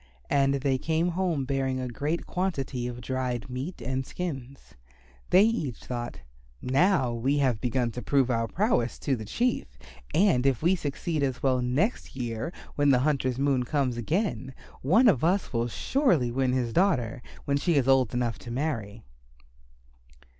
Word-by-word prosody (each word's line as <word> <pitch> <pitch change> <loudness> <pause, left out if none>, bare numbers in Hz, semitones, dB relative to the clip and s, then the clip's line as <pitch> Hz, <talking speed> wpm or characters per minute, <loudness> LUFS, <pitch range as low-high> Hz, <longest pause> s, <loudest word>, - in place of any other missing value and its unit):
And 140 -1 +3
they 135 -1 0
came 165 +4 0
home 170 -6 -1
bearing 130 -1 -1
a 130 - -3
great 145 +7 -2
quantity 140 -9 -2
of 120 0 -6
dried 125 0 -3
meat 130 +3 -5
and 130 +2 -2
skins. 135 -5 -6 0.6
They 190 - +6
each 185 - 0
thought, 120 - -5 0.4
"Now 135 -1 +2
we 130 +5 0
have 130 -6 +1
begun 125 -1 0
to 125 - -6
prove 130 +2 +2
our 115 -1 0
prowess 180 - 0
to 140 - 0
the 110 -3 -7
Chief, 170 - -1 0.3
and 160 -9 +3
if 135 +1 +1
we 180 +3 +4
succeed 155 0 -3
as 130 -2 -1
well 130 -2 +2
next 140 - -1
year 120 +4 -3 0.2
when 145 0 +2
the 135 - +5
hunter's 130 -4 0
moon 135 -2 +2
comes 130 -1 0
again, 130 - -2 0.3
one 220 - +5
of 155 - +3
us 180 0 +1
will 115 0 +1
surely 165 - +1
win 130 +1 +1
his 120 -3 -1
daughter 135 - +1 0.2
when 140 0 +1
she 170 +3 +1
is 135 -3 +2
old 135 -3 +4
enough 120 -2 -1
to - - -10
marry." 120 -5 -3
135 Hz, 165 wpm, -27 LUFS, 125-160 Hz, 0.6 s, They